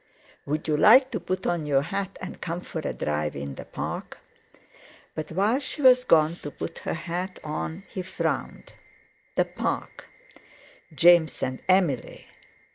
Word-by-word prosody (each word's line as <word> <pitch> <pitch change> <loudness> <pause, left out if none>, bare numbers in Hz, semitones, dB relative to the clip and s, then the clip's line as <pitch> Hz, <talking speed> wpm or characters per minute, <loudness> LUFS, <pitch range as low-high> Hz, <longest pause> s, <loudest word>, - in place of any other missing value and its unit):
"Would 150 +3 -2
you 155 - +2
like 260 - +7
to - - -2
put 185 0 -3
on 170 -3 -1
your 140 -1 +3
hat 195 +4 -4
and 185 - -8
come 170 +1 -3
for 165 - -6
a - - -2
drive 75 0 -2
in 70 0 -5
the - - -9
Park?" - - -5 1.0
But 155 - -5
while 205 +9 +2
she 290 +1 -5
was 250 -1 +7
gone 160 +1 +4
to 145 - -7
put 165 - -7
her - - -3
hat 180 +3 -4
on, 160 +4 -4
he 190 - -5
frowned. 185 - -3 0.6
The - - +3
Park! - - -4 0.9
James 170 -1 +5
and 130 0 -3
Emily! 180 -9 +1
170 Hz, 155 wpm, -26 LUFS, 150-190 Hz, 1.0 s, like